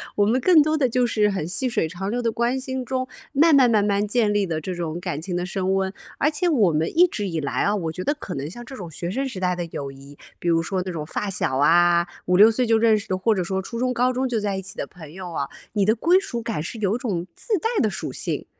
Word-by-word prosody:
我 205 Hz, -, +3 dB
们 235 Hz, +5 st, +2 dB
更 345 Hz, -1 st, +6 dB
多 310 Hz, +1 st, +1 dB
的 275 Hz, -4 st, +2 dB
就 250 Hz, +1 st, +2 dB
是 210 Hz, -3 st, +2 dB
很 190 Hz, -6 st, -2 dB
细 255 Hz, +8 st, 0 dB
水 190 Hz, -, 0 dB
长 190 Hz, +3 st, -4 dB
流 245 Hz, +3 st, -1 dB
的 230 Hz, -, +1 dB
关 240 Hz, +3 st, 0 dB
心 260 Hz, -1 st, -4 dB
中， 255 Hz, +1 st, -2 dB, 0.3 s
慢 310 Hz, +3 st, +5 dB
慢 255 Hz, -3 st, +6 dB
慢 215 Hz, -3 st, +3 dB
慢 205 Hz, 0 st, +1 dB
建 215 Hz, -1 st, +2 dB
立 205 Hz, -2 st, +1 dB
的 160 Hz, -2 st, -2 dB
这 185 Hz, +4 st, -4 dB
种 170 Hz, -2 st, -4 dB
感 145 Hz, -1 st, -3 dB
情 180 Hz, 0 st, -4 dB
的 175 Hz, -, -1 dB
升 190 Hz, 0 st, -1 dB
温。 190 Hz, 0 st, -1 dB, 0.2 s
而 300 Hz, -, +2 dB
且 355 Hz, +4 st, 0 dB
我 220 Hz, -, +3 dB
们 155 Hz, +2 st, 0 dB
一 355 Hz, -, +8 dB
直 210 Hz, -, -3 dB
以 165 Hz, -2 st, -2 dB
来 140 Hz, -, -1 dB
啊， 205 Hz, -, +2 dB
我 165 Hz, -6 st, -2 dB
觉 180 Hz, -, -6 dB
得 290 Hz, -, +2 dB
可 200 Hz, -10 st, -7 dB
能 140 Hz, +2 st, -4 dB
像 240 Hz, +8 st, -9 dB
这 265 Hz, -, -9 dB
种 180 Hz, -4 st, -7 dB
学 170 Hz, +3 st, -5 dB
生 270 Hz, +6 st, -1 dB
时 210 Hz, -7 st, -7 dB
代 180 Hz, -1 st, +1 dB
的 175 Hz, -, -3 dB
友 140 Hz, -1 st, -5 dB
谊， 140 Hz, +1 st, -14 dB, 0.2 s
比 -, -, -5 dB
如 165 Hz, -1 st, +3 dB
说 185 Hz, +2 st, -2 dB
这 185 Hz, -, -5 dB
种 155 Hz, -3 st, -5 dB
发 200 Hz, +6 st, -3 dB
小 155 Hz, -8 st, -1 dB
啊， 170 Hz, +4 st, +4 dB, 0.2 s
5，6 190 Hz, +5 st, +7 dB
岁 245 Hz, +3 st, +1 dB
就 225 Hz, -1 st, +3 dB
认 220 Hz, -1 st, +4 dB
识 210 Hz, +1 st, -7 dB
的， 185 Hz, -, +1 dB
或 210 Hz, +4 st, +2 dB
者 185 Hz, -, 0 dB
说 190 Hz, +2 st, -2 dB
初 230 Hz, +5 st, -7 dB
中 250 Hz, +1 st, 0 dB
高 250 Hz, +1 st, +2 dB
中 260 Hz, +1 st, 0 dB
就 240 Hz, -3 st, -1 dB
在 205 Hz, -2 st, -1 dB
一 -, -, -3 dB
起 190 Hz, -, -3 dB
的 -, -, -3 dB
朋 160 Hz, -5 st, -12 dB
友 180 Hz, -1 st, -7 dB
啊， 140 Hz, -3 st, -2 dB, 0.3 s
你 205 Hz, -2 st, +2 dB
的 215 Hz, -, +4 dB
归 335 Hz, +11 st, +3 dB
属 245 Hz, -12 st, -5 dB
感 225 Hz, -9 st, -3 dB
是 220 Hz, +7 st, -6 dB
有 205 Hz, +1 st, +1 dB
种 190 Hz, -8 st, -3 dB
自 460 Hz, -, -3 dB
带 450 Hz, -, -1 dB
的 220 Hz, -, +2 dB
属 -, -, -5 dB
性。 -, -, -3 dB
205 Hz, 305 characters per minute, -23 LUFS, 175-245 Hz, 0.3 s, 一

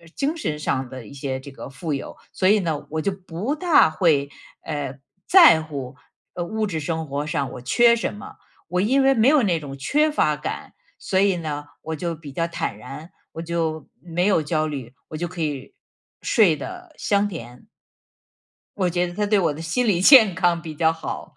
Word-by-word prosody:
精 295 Hz, +4 st, -1 dB
神 150 Hz, -, -3 dB
上 130 Hz, -4 st, -2 dB
的 130 Hz, -5 st, -9 dB
一 -, -, -12 dB
些 135 Hz, -1 st, -4 dB
这 140 Hz, +1 st, -11 dB
个 135 Hz, -, -9 dB
富 150 Hz, +3 st, -4 dB
有， 140 Hz, -, -6 dB
所 185 Hz, -, 0 dB
以 210 Hz, +1 st, +5 dB
呢， 160 Hz, -5 st, -3 dB
我 160 Hz, 0 st, -2 dB
就 200 Hz, -, 0 dB
不 190 Hz, -, -4 dB
大 325 Hz, -, +4 dB
会， 155 Hz, -3 st, +2 dB, 0.3 s
呃， 145 Hz, -4 st, -5 dB, 0.3 s
在 335 Hz, -, +7 dB
乎， 135 Hz, -4 st, -7 dB, 0.4 s
呃， 175 Hz, -, -3 dB
物 220 Hz, +2 st, -2 dB
质 160 Hz, -5 st, -3 dB
生 160 Hz, +1 st, -3 dB
活 140 Hz, +2 st, -3 dB
上 145 Hz, -4 st, -2 dB
我 -, -, -8 dB
缺 235 Hz, -, +4 dB
什 225 Hz, -, -3 dB
么。 205 Hz, -, -10 dB, 0.3 s
我 180 Hz, +2 st, 0 dB
因 265 Hz, +7 st, +3 dB
为 270 Hz, 0 st, +5 dB
没 225 Hz, +3 st, +4 dB
有 295 Hz, -1 st, +5 dB
那 175 Hz, -5 st, +1 dB
种 140 Hz, -2 st, -8 dB
缺 300 Hz, -, +1 dB
乏 150 Hz, -, +1 dB
感， 150 Hz, -, -6 dB, 0.3 s
所 190 Hz, -, 0 dB
以 195 Hz, -2 st, +3 dB
呢， 150 Hz, -3 st, -4 dB, 0.2 s
我 160 Hz, 0 st, -4 dB
就 170 Hz, +1 st, -3 dB
比 150 Hz, -3 st, -11 dB
较 165 Hz, +4 st, -1 dB
坦 165 Hz, -11 st, -4 dB
然、 135 Hz, +9 st, -10 dB, 0.2 s
我 165 Hz, -, -6 dB
就 165 Hz, -2 st, -3 dB
没 175 Hz, 0 st, -2 dB
有 190 Hz, -6 st, +3 dB
焦 155 Hz, 0 st, 0 dB
虑、 135 Hz, -5 st, -6 dB, 0.2 s
我 155 Hz, -, -6 dB
就 175 Hz, +1 st, -3 dB
可 175 Hz, -1 st, -7 dB
以 145 Hz, -3 st, -4 dB, 0.5 s
睡 195 Hz, -9 st, +4 dB
得 360 Hz, -, -9 dB
香 205 Hz, 0 st, +1 dB
甜。 125 Hz, -9 st, -9 dB, 1.1 s
我 185 Hz, -3 st, +1 dB
觉 175 Hz, +1 st, 0 dB
得 175 Hz, -, -8 dB
它 210 Hz, +2 st, -1 dB
对 205 Hz, 0 st, +3 dB
我 165 Hz, -5 st, +1 dB
的 155 Hz, -, -8 dB
心 195 Hz, +10 st, -1 dB
理 180 Hz, -4 st, +2 dB
健 220 Hz, -6 st, +8 dB
康 175 Hz, -2 st, +1 dB
比 160 Hz, -2 st, -8 dB
较 160 Hz, +1 st, +3 dB
好。 160 Hz, -1 st, -7 dB
165 Hz, 220 characters per minute, -23 LUFS, 150-200 Hz, 1.1 s, 健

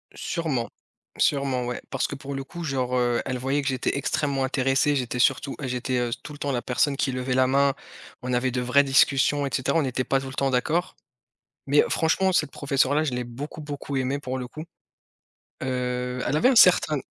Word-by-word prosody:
Sûrement, 150 Hz, -9 st, -2 dB, 0.5 s
sûrement 135 Hz, -3 st, +1 dB
ouais 125 Hz, 0 st, -4 dB
parce 135 Hz, -, -1 dB
que -, -, -7 dB
pour 140 Hz, 0 st, -7 dB
le 135 Hz, -, -4 dB
coup 170 Hz, +6 st, -8 dB
genre, 130 Hz, -4 st, -1 dB
heu, 120 Hz, -1 st, +1 dB
elle 130 Hz, -1 st, -2 dB
voyait 135 Hz, +3 st, 0 dB
que -, -, -4 dB
j'étais 130 Hz, +1 st, -1 dB
extrêmement 140 Hz, -1 st, -1 dB
intéressé, 135 Hz, +2 st, +1 dB
j'étais 125 Hz, -2 st, -2 dB
surtout 135 Hz, +2 st, +2 dB
j'étais, 125 Hz, 0 st, -2 dB
heu, 120 Hz, -, 0 dB
tout 150 Hz, -, -8 dB
le 145 Hz, -, -10 dB
temps 145 Hz, -, -2 dB
la 125 Hz, -2 st, -1 dB
personne 135 Hz, +2 st, 0 dB
qui 135 Hz, -, 0 dB
levait 130 Hz, 0 st, -2 dB
la 130 Hz, 0 st, +3 dB
main, 140 Hz, +1 st, +3 dB, 0.5 s
on 125 Hz, -, -4 dB
avait 125 Hz, +1 st, +1 dB
de 125 Hz, 0 st, -1 dB
vraies 125 Hz, +3 st, +4 dB
discussions 140 Hz, +1 st, +3 dB
et -, -, -3 dB
cetera, 130 Hz, +5 st, +1 dB
on -, -, +3 dB
n'était 130 Hz, -2 st, -1 dB
pas 135 Hz, -, +1 dB
tout 135 Hz, -, -7 dB
le 130 Hz, -, -8 dB
temps 135 Hz, 0 st, +1 dB
d'accord, 160 Hz, +8 st, 0 dB, 0.7 s
mais 145 Hz, +2 st, +4 dB
franchement 190 Hz, +4 st, +2 dB
cette 175 Hz, -, +1 dB
professeure-là, 140 Hz, +1 st, +1 dB
je 145 Hz, -5 st, -2 dB
l'ai 125 Hz, 0 st, -2 dB
beaucoup 140 Hz, +7 st, -8 dB
beaucoup 145 Hz, -1 st, -6 dB
aimé 135 Hz, +2 st, -1 dB
pour 130 Hz, -2 st, -4 dB
le 125 Hz, -, -5 dB
coup. 155 Hz, +5 st, -8 dB, 1.0 s
Heu, 125 Hz, -1 st, -2 dB
elle 150 Hz, -, +1 dB
avait 245 Hz, -, +4 dB
un 260 Hz, -, +1 dB
certain 175 Hz, -7 st, +6 dB
135 Hz, 210 wpm, -25 LUFS, 125-145 Hz, 1.0 s, certain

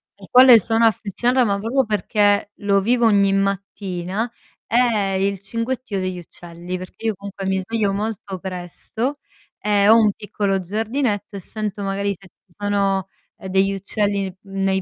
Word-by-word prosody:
al 195 Hz, -2 st, -14 dB
quale 250 Hz, -2 st, +8 dB
sono 225 Hz, +3 st, +2 dB
affezionata, 240 Hz, +4 st, +2 dB
ma 200 Hz, -1 st, +1 dB
proprio 245 Hz, +5 st, +1 dB
perché 205 Hz, 0 st, +1 dB
lo 200 Hz, -1 st, +2 dB
vivo 240 Hz, +3 st, +2 dB
ogni 200 Hz, -3 st, +4 dB
mattina, 195 Hz, +1 st, -2 dB, 0.4 s
è 225 Hz, -5 st, +2 dB
il 195 Hz, 0 st, 0 dB
cinguettio 230 Hz, +1 st, -3 dB
degli 185 Hz, -1 st, -3 dB
uccelli, 175 Hz, +1 st, -7 dB
perché 185 Hz, +4 st, -10 dB
io 220 Hz, -, +1 dB
comunque 200 Hz, 0 st, -7 dB
mi 190 Hz, 0 st, +1 dB
sveglio 205 Hz, 0 st, -1 dB
molto 205 Hz, -2 st, -4 dB
presto 190 Hz, +9 st, -4 dB, 0.4 s
e 205 Hz, -1 st, +2 dB
ho 225 Hz, -, +9 dB
un 215 Hz, -2 st, +4 dB
piccolo 200 Hz, -1 st, -2 dB
giardinetto 215 Hz, +2 st, -2 dB
e -, -, -5 dB
sento 210 Hz, +1 st, -5 dB
magari 200 Hz, +1 st, -1 dB
se 195 Hz, -, -17 dB
ci -, -, -35 dB
sono, 200 Hz, -2 st, 0 dB, 0.3 s
ehm, -, -, -9 dB
degli 195 Hz, +1 st, +2 dB
uccelli 195 Hz, -1 st, -1 dB
nei 195 Hz, -1 st, -1 dB
200 Hz, 155 wpm, -21 LUFS, 195-220 Hz, 0.4 s, ho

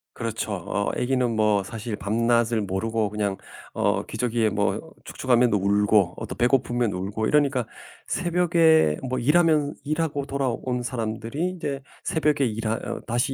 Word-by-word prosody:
그렇죠. 115 Hz, -2 st, -3 dB
어 100 Hz, +2 st, -2 dB
애기는 125 Hz, -2 st, 0 dB
뭐 105 Hz, -2 st, +2 dB
사실 110 Hz, +2 st, -5 dB
밤낮을 115 Hz, +3 st, +1 dB
모르고 105 Hz, +2 st, -1 dB
그냥 100 Hz, -2 st, -2 dB, 0.4 s
어 -, -, +1 dB
기저귀에 115 Hz, -2 st, 0 dB
뭐 100 Hz, 0 st, -1 dB
축축하면 125 Hz, -2 st, +2 dB
울고, 100 Hz, -1 st, +3 dB
어 -, -, -5 dB
또 -, -, -6 dB
배고프면 120 Hz, -3 st, +1 dB
울고 100 Hz, +4 st, -3 dB
이러니까 140 Hz, -5 st, +2 dB, 0.4 s
새벽에 165 Hz, -, +3 dB
뭐 130 Hz, -, -1 dB
일하면 150 Hz, +2 st, +3 dB
일하고 150 Hz, -1 st, -1 dB
돌아온 130 Hz, -2 st, -2 dB
사람들이 115 Hz, +7 st, -3 dB
이제 145 Hz, -6 st, -4 dB, 0.2 s
새벽에 150 Hz, -3 st, +1 dB
일하 110 Hz, -1 st, -1 dB
어 -, -, -5 dB
다시 120 Hz, +4 st, 0 dB
120 Hz, 310 characters per minute, -24 LUFS, 105-140 Hz, 0.4 s, 울고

